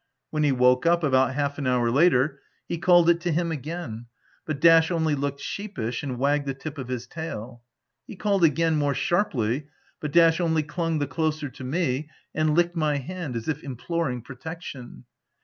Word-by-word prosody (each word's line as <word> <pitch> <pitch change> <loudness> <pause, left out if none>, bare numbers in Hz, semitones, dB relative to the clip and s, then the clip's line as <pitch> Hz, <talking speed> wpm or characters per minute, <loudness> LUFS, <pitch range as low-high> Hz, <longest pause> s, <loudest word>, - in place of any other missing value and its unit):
When 155 - -1
he 150 -2 +3
woke 125 +2 +3
up, 170 0 +3
about 130 -2 +3
half 145 0 -1
an 140 - -2
hour 125 -2 +2
after, 140 0 +3 0.3
he 170 - -3
called 175 -1 +5
it 170 0 +4
to 175 0 -1
him 170 +1 0
again; 145 -6 -5 0.4
but 155 -3 -3
Dash 165 0 +6
only 160 -3 +1
looked 140 0 -2
sheepish 125 - -4
and 130 -3 -4
wagged 140 +2 +1
the 135 - -2
tip 145 +2 -7
of 130 - -5
his 125 -1 -4
tail. 125 -5 -7 0.5
He - - -8
called 200 -1 +1
again, 160 +1 +3
more 145 -2 +1
sharply, 140 - 0 0.3
but 150 - -4
Dash 165 0 +5
only 160 -2 +1
clung 165 +2 -2
the 145 - 0
closer 155 +1 -2
to 130 +1 -11
me, 150 0 -1 0.2
and 155 -1 +1
licked 175 +1 +2
my 155 -3 +1
hand 155 -1 -5
as 115 - -4
if 150 -2 -2
implo 160 +5 -3
ring 125 -3 -4
protection. 130 - -9
150 Hz, 190 wpm, -25 LUFS, 130-165 Hz, 0.5 s, Dash